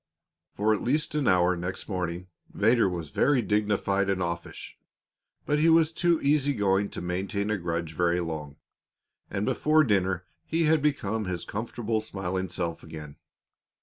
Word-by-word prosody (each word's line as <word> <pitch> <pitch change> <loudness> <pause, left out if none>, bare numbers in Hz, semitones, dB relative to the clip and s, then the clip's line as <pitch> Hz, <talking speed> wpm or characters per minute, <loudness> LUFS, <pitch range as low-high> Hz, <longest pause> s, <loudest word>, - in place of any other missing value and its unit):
For 110 +2 +2
at 105 - -2
least 150 +6 0
an 150 -3 0
hour 90 0 +4
next 90 +2 -5
morning 90 -2 -3 0.3
Vedder 115 0 +3
was 85 -4 -5
very 135 -4 +2
dignified 100 -2 +1
and 95 -1 +1
offish. 85 -1 -5 0.7
But 150 0 +1
he 160 +2 +4
was 160 -1 +5
too 170 0 +2
easy 145 0 +2
going 100 -1 +1
to - - -7
maintain 95 +3 -2
a 105 - +1
grudge 85 -2 -3
very 85 +2 +1
long, 75 -4 -5 0.7
and 100 +1 -2
before 155 +6 +3
dinner 95 - +1 0.2
he 165 +1 0
had 155 -1 +3
become 110 -7 0
his 90 -2 -4
comfortable, 115 0 -2
smiling 95 -3 -3
self 85 -1 -3
again. 75 -2 -9
100 Hz, 155 wpm, -27 LUFS, 90-120 Hz, 0.7 s, was